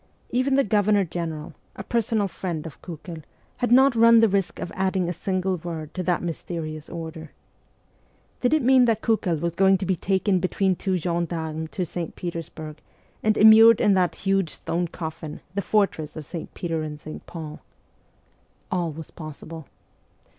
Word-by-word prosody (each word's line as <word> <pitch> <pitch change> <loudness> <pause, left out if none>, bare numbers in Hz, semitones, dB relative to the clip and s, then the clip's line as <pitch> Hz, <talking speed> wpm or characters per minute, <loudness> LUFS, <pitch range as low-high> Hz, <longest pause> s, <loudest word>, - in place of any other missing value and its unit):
Even 255 +2 +2
the 275 - +4
Governor 205 -2 +3
General, 165 -2 -5 0.2
a 195 - -6
personal 225 -2 0
friend 170 -3 -5
of 160 - -10
Kiikel, 165 -1 -8 0.4
had 245 -2 -1
not 265 +1 +6
run 230 0 +7
the 225 - +6
risk 195 -2 0
of - - -5
adding 190 -1 0
a 175 - -1
single 185 +1 -1
word 160 -2 -6
to 185 - -3
the 180 -1 +1
mysterious 160 -2 -5
order. 160 -2 -7 1.1
Did 250 +5 +3
it 305 - +1
mean 255 0 +6
that 225 -2 +1
Kukel 210 -7 +1
was 170 +1 -1
going 190 +2 +4
to 190 - -4
be 190 0 +1
taken 190 +1 +1
between 190 +1 +1
two 190 +1 -1
gendarmes 165 -2 -2
to 185 - -1
St. 170 -1 -5
Petersburg, 165 -3 -6 0.4
and 215 0 +2
immured 220 +1 +8
in 205 - +4
that 180 -4 +2
huge 195 -3 0
stone 170 +3 -2
coffin, 160 -2 -7
the 200 - -1
fortress 195 -8 0
of 155 -2 -7
St. 170 +1 -7
Peter 165 -2 -2
and 150 -1 -6
St. 155 +1 -9
Paul? 155 -3 -7 1.1
All 175 -3 0
was 155 +1 -9
possible. 155 0 -9
180 Hz, 170 wpm, -24 LUFS, 160-200 Hz, 1.1 s, immured